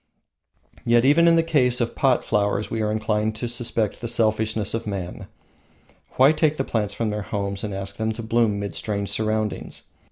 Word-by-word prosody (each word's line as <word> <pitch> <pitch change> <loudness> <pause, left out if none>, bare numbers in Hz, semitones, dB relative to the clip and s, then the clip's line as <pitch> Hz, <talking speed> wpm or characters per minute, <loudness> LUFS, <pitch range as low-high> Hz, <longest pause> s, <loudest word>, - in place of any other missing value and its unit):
Yet 120 +1 +3
even 160 +5 +5
in 165 - +6
the 165 - +3
case 130 -7 +2
of 120 -1 -1
pot 130 -3 +2
flowers 105 -1 0
we 110 - -1
are 105 0 0
inclined 110 0 -1
to 120 +2 -4
suspect 115 -3 -2
the 120 - -3
selfishness 110 -2 +1
of 115 -1 -3
man. 95 -4 -5 0.9
Why 135 +3 +6
take 155 -1 +1
the 135 - 0
plants 105 -5 -2
from 115 -2 -1
their 105 0 -3
homes 100 -1 -3
and 105 - -3
ask 95 0 -4
them 110 0 -1
to 115 +1 -7
bloom 110 -2 +1
mid 100 -1 -4
strange 100 -2 -3
surroundings? 110 -1 -2
110 Hz, 190 wpm, -23 LUFS, 105-120 Hz, 0.9 s, in